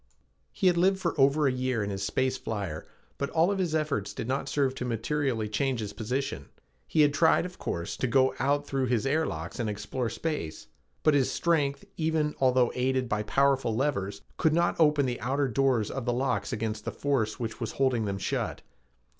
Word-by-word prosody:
He - - -3
had 180 -2 +5
lived 190 +2 +4
for 175 -3 -1
over 140 +3 +4
a 135 - +4
year 125 -3 -1
in 100 - -3
his 95 0 -3
space 130 +6 0
flyer, 100 -11 -4 0.3
but 140 - -1
all 165 +4 +3
of 200 - -1
his 170 -4 0
efforts 140 -11 -1
did - - -4
not 135 +2 -1
serve 135 -3 +1
to 130 - -5
materially 125 -1 -1
change 125 +4 0
his 105 -2 -4
position. 125 +5 -3 0.4
He 155 - +3
had 145 -1 +4
tried, 160 +2 +4
of 180 0 -9
course, 85 0 -3
to 130 - 0
go 130 +1 +3
out 145 +3 +1
through 135 -2 -1
his 120 -2 +1
air 155 +4 +1
locks 80 +9 -5
and 115 -3 -1
explore 105 +4 -3
space, 115 - -4 0.4
but 155 - +5
his 140 -3 +3
strength, 145 -5 0
even 155 -2 +1
although 130 -2 +3
aided 130 0 0
by 105 -2 0
powerful 135 +1 +2
levers, 100 -7 -1 0.2
could 160 - +2
not 170 +1 +2
open 150 -3 +4
the 125 -1 -3
outer 135 +2 0
doors 125 -3 +1
of 135 -3 -4
the 120 - +1
locks 130 +2 -1
against 105 -1 -3
the - - -3
force 130 -7 -1
which 115 -2 -4
was 115 -1 -3
holding 130 -5 +1
them 100 -1 -2
shut. 95 - -2
130 Hz, 205 wpm, -28 LUFS, 110-145 Hz, 0.4 s, had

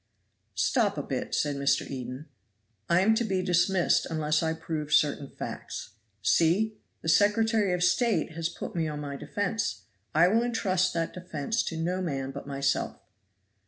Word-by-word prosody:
"Stop - - +2
a - - -2
bit," - - -3
said 145 -1 0
Mr. 140 0 +1
Eden; 130 +1 -6 0.6
"I 170 +1 +5
am 220 +3 +4
to 230 +2 +1
be 190 -4 0
dismissed 180 0 +2
unless 155 -1 +1
I 160 -1 0
prove 160 -2 -4
certain 145 -2 +2
facts. - - -7 0.3
See! 195 - +2 0.2
the - - -5
Secretary 210 +3 +3
of 180 0 0
State 225 +2 +2
has 165 +1 -2
put - - -7
me 165 -2 0
on 150 -1 -4
my 145 -1 -5
defense. 150 - -2 0.3
I 165 +3 +6
will 220 +5 +3
intrust 190 -6 +1
that 165 -1 -1
defense 180 +3 -2
to 165 - -3
no 180 +3 -1
man 135 -6 -2
but 140 +1 -8
myself." 140 0 -1
165 Hz, 160 wpm, -28 LUFS, 150-190 Hz, 0.6 s, I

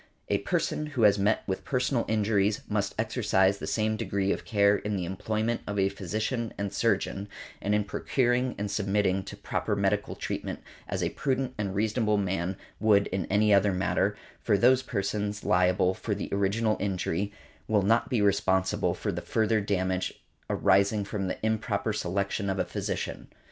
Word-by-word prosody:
A - - +2
person 150 - -1
who 135 -6 -1
has 100 -1 +5
met 105 +2 +2
with 95 - -3
personal 125 -2 0
injuries 105 -1 +1
must 105 -1 -1
exercise 105 -4 +2
the - - -5
same 110 0 0
degree 100 -3 0
of - - -3
care 100 -1 +4
in 105 0 -3
the 90 -2 -2
employment 110 +5 -2
of 105 - -3
a 95 0 +3
physician 110 +5 -3
and 100 -1 -3
surgeon, 100 +1 0 0.3
and 105 +1 +1
in 105 - +2
procuring 125 +4 0
and 105 0 -3
submitting 100 -1 +1
to - - -8
proper - - -2
medical 100 +1 0
treatment, - - -4 0.2
as - - -2
a - - +1
prudent 130 -2 -1
and 100 -2 -2
reasonable 105 +1 +1
man 95 -1 -1 0.2
would 105 -2 +4
in 95 -2 -2
any 105 +1 +3
other 100 0 +4
matter; 95 +2 0 0.2
for 100 - +2
those 125 +4 +5
persons 105 -3 -2
liable 90 +1 +3
for 105 +2 -3
the 100 - -5
original 105 +3 +1
injury 100 0 -1 0.4
will 105 -2 +2
not 115 +4 +2
be 115 -5 +1
responsible 95 -1 +2
for - - -2
the - - -4
further 110 -1 +1
damage 95 -2 -1 0.3
arising 100 +2 +3
from 100 -1 -3
the - - -3
improper 110 -1 0
selection 100 +1 -1
of 95 - -1
a - - 0
physician. - - -4
100 Hz, 170 wpm, -28 LUFS, 95-110 Hz, 0.4 s, has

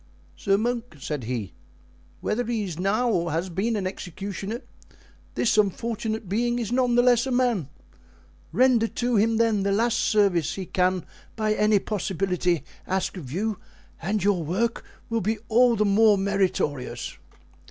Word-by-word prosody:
"Sir 195 -1 +1
monk," 235 -2 -2
said 140 -3 -4
he, 115 -5 -4 0.7
"whether 220 +3 0
he 225 -2 -1
is 175 -4 -5
now 210 +6 +1
or 170 -5 0
has 170 +4 -1
been 200 +7 -1
an 200 -3 -2
executioner, 195 +4 -5 0.7
this 220 - +2
unfortunate 220 +1 -1
being 240 +5 0
is 230 -2 -3
none 250 -1 +2
the 245 - +5
less 245 0 +4
a - - -2
man. 245 - +1 0.8
Render 250 -3 +4
to 245 +1 -1
him, 225 +2 +3
then, 225 -3 +2
the 200 +1 +1
last 235 +3 +2
service 195 -7 +2
he 190 - -5
can 180 0 0 0.3
by 215 -1 +1
any 210 0 +3
possibility 185 -4 -1 0.2
ask 190 +1 -1
of 145 -9 -8
you, 205 +5 -2 0.4
and 195 +3 -1
your 195 -4 +2
work 210 +9 -1 0.2
will 230 -1 -1
be 215 +4 0
all 240 +1 +5
the 210 -1 +2
more 210 +1 +5
meritorious." 190 -9 -1
210 Hz, 155 wpm, -25 LUFS, 185-230 Hz, 0.8 s, the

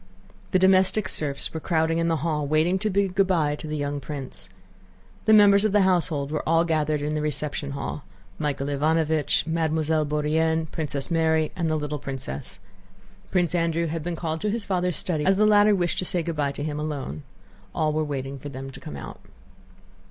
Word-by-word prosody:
The - - +3
domestic 190 +2 +4
serfs 140 -2 -1
were 160 - -3
crowding 165 0 +1
in 165 - +1
the 165 - +2
hall, 150 -3 0
waiting 160 +5 +2
to 215 +2 0
bid 195 -1 +1
good 195 0 +3
by 160 -6 +2
to 155 - -7
the 155 0 -3
young 145 0 -2
prince. 135 -1 -7 0.8
The - - +4
members 200 -1 +7
of 215 -2 +1
the 205 -2 +5
household 165 -6 +1
were 155 - -1
all 165 0 +4
gathered 155 -3 0
in 150 +1 -1
the 155 - -1
reception 150 -1 -3
hall: 140 +1 -5 0.4
Michael 145 -3 -1
Ivánovich, 155 +1 +1
Mademoiselle 160 -1 0
Bourienne, 160 +2 +1
Princess 150 -1 -3
Mary, 160 -1 +2
and 170 -2 -1
the 155 - +1
little 150 -1 -3
princess. 135 -6 -6 0.7
Prince 175 -3 +1
Andrew 170 -1 +1
had 165 0 -3
been 170 +2 -3
called 160 -1 -3
to 210 - 0
his 220 0 -2
father's 180 -2 0
study 160 -5 -1
as 190 +5 +4
the 215 - +4
latter 210 0 +5
wished 175 -2 0
to 185 - -1
say 175 -1 0
good 165 0 -3
by 145 -2 0
to 145 - -5
him 150 -1 -3
alone. 150 -1 -4 0.5
All 155 -1 +1
were 155 +1 0
waiting 140 -2 -4
for 145 - -7
them 135 0 -7
to - - -11
come 70 - -8
out. - - -9
160 Hz, 200 wpm, -25 LUFS, 150-175 Hz, 0.8 s, members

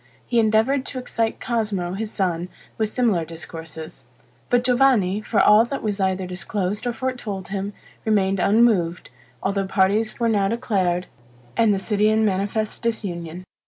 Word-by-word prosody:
He 240 - +1
endeavored 225 +5 +3
to 260 - -5
excite 230 -3 -2
Cosmo, 210 -7 -1
his 215 +2 -3
son, 180 -3 -1 0.3
with 220 -1 +1
similar 215 -8 +1
discourses; 160 -3 -9 0.4
but 245 0 +3
Giovanni, 245 -6 +3
for 215 0 0
all 210 +2 +7
that 275 +3 -5
was 210 -2 -2
either 190 -1 0
disclosed 190 +4 -3
or - - +1
foretold 225 -6 -4
him, 200 +1 -3 0.3
remained 195 -3 +2
unmoved, 195 - +2 0.3
although 195 0 0
parties 210 +4 +1
were 235 - +2
now 205 -3 +2
declared, 190 -5 0 0.5
and 225 -2 +4
the 200 - +2
city 210 +2 +1
in 220 0 +3
manifest 205 +2 -1
disunion. 180 -7 -3
205 Hz, 150 wpm, -23 LUFS, 185-225 Hz, 0.5 s, all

